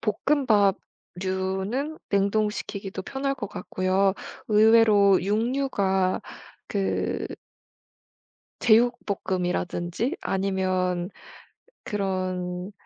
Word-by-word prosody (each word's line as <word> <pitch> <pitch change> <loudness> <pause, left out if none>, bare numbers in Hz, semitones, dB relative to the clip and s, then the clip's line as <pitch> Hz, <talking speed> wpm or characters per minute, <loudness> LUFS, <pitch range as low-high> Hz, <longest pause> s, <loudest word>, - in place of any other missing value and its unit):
볶음밥 215 -4 +2 0.5
류는 190 +11 -2
냉동시키기도 200 -1 -1
편할 275 +4 -2
것 220 -6 -5
같고요. 190 +1 0 0.4
의외로 215 -2 +6
육류가 205 -4 +1 0.5
그 195 -2 -1 1.3
제육볶음이라든지 200 - +1
아니면 185 -1 -1 0.7
그런 185 -2 -3
200 Hz, 175 characters per minute, -25 LUFS, 185-220 Hz, 1.3 s, 의외로